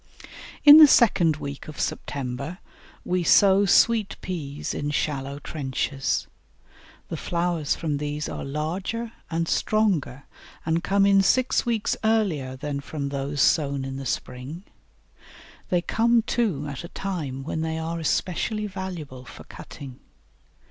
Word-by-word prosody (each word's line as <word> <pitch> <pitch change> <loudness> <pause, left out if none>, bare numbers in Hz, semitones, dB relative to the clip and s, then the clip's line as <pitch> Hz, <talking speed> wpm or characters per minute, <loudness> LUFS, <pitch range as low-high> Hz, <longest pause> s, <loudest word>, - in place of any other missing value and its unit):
In 290 +1 +12
the 310 -1 +11
second 180 - +4
week 140 -2 -7
of 155 - -9
September 140 +4 -4 0.5
we 180 0 0
sow 195 +3 +5
Sweet 220 +1 +3
Peas 150 -6 -5
in 145 - -3
shallow 140 -2 -2
trenches. 135 -2 -2 0.8
The - - -4
flowers 170 -3 -1
from 150 -3 -2
these 150 +1 -3
are - - -5
larger 180 +11 -3 0.2
and 165 0 -1
stronger 180 - 0 0.4
and 165 +2 0
come 195 +1 +3
in 195 0 +5
six 255 +5 +2
weeks 225 -3 0
earlier 190 -13 0
than 140 +1 -4
from 140 0 -5
those 140 0 -2
sown 140 -4 +1
in 135 0 -5
the 135 -1 -5
spring; 130 +10 -5 1.1
they 175 -1 +1
come 230 +2 +2
too 205 - -1
at 140 +1 -6
a - - -6
time 155 -10 -5
when 160 +2 -3
they 160 0 -2
are 165 +1 -3
especially 190 +6 -1
valuable 180 -10 -7
for - - -12
cutting. 130 -3 -11
160 Hz, 135 wpm, -25 LUFS, 140-195 Hz, 1.1 s, In